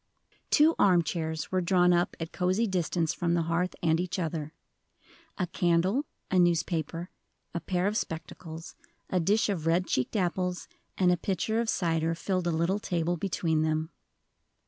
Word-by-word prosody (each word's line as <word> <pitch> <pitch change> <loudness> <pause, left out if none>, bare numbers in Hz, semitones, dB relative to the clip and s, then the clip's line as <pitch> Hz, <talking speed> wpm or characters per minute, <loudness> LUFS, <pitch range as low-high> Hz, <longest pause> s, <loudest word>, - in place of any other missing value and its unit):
Two 310 +2 +5
arm 180 -4 +5
chairs 160 -1 -3
were 185 -1 +2
drawn 180 0 +4
up 175 0 +1
at 165 0 -5
cozy 185 +5 +1
distance 175 -4 0
from 170 -1 0
the 170 - +1
hearth 170 +3 -1
and 160 -1 +3
each 180 +1 -2
other; 160 -3 -3 0.9
a 185 - 0
candle, 180 - +1 0.3
a 185 - +4
newspaper, 170 -1 0 0.4
a 170 - -1
pair 180 +2 -1
of 205 +1 0
spectacles, 165 -2 -5 0.4
a 185 - +2
dish 205 +6 +2
of 175 -6 -2
red 175 +2 +3
cheeked 130 - -1
apples, 180 -1 -1 0.3
and 180 -2 +4
a 180 - +2
pitcher 200 +5 -1
of 230 -1 0
cider, 165 -1 +1
filled 185 +1 -1
a - - +2
little 170 +5 +1
table 175 -3 -1
between 165 -3 0
them. 155 +1 0
175 Hz, 165 wpm, -29 LUFS, 165-185 Hz, 0.9 s, Two